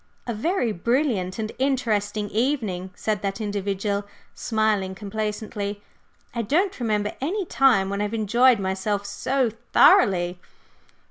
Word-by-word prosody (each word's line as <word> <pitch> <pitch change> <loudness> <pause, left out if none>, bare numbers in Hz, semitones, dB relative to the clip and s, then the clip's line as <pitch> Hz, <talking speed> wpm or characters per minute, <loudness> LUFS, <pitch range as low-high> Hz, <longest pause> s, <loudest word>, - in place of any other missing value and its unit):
"A 235 - -2
very 245 - 0
brilliant 215 - 0
and 220 -1 -3
interesting 215 -6 0
evening!" 215 -7 -1
said 215 -2 -2
that 195 +1 -3
individual, 200 -1 -2 0.3
smiling 215 -4 0
complacently. 210 0 -4 0.5
"I 235 - -1
don't 345 - 0
remember 210 -3 0
any 375 +8 -1
time 250 - +3
when 200 +1 -2
I - - +1
have 210 - -5
enjoyed 235 +3 +4
myself 200 +1 -2
so 250 +4 0 0.2
thoroughly." 180 -4 +5
210 Hz, 125 wpm, -24 LUFS, 200-240 Hz, 0.5 s, thoroughly